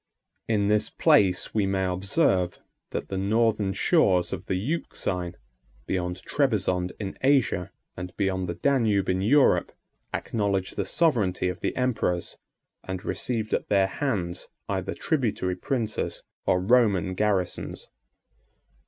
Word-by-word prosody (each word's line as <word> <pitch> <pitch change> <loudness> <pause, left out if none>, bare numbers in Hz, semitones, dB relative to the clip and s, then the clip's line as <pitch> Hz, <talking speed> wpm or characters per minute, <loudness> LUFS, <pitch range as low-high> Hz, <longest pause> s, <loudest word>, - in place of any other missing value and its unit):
In 105 -3 +2
this 105 0 +2
place 95 -1 +3
we 105 -3 +1
may 95 -1 0
observe, 95 - +1 0.3
that - - -4
the 95 - -2
northern 105 0 +2
shores 95 - +2
of 90 -1 -6
the - - 0
Euxine, 90 - -2 0.5
beyond 90 0 -2
Trebizond 95 -10 +1
in 100 -2 -5
Asia, 130 -10 +2 0.2
and 90 +1 -6
beyond 95 -3 0
the 85 - -3
Danube 110 -6 +2
in 95 0 +1
Europe, 135 +8 +4 0.4
acknowledged 100 -4 -1
the - - -1
sovereignty 105 - +2
of 90 0 -5
the - - -2
emperors, 110 -9 -1 0.4
and 95 +1 -5
received 110 -3 -2
at - - -1
their 100 -2 +4
hands 95 - -2 0.2
either - - -2
tributary 110 - 0
princes 110 +1 -2 0.2
or 90 - +4
Roman 100 -4 +3
garrisons. 95 -2 -1
95 Hz, 125 wpm, -26 LUFS, 90-115 Hz, 0.5 s, Europe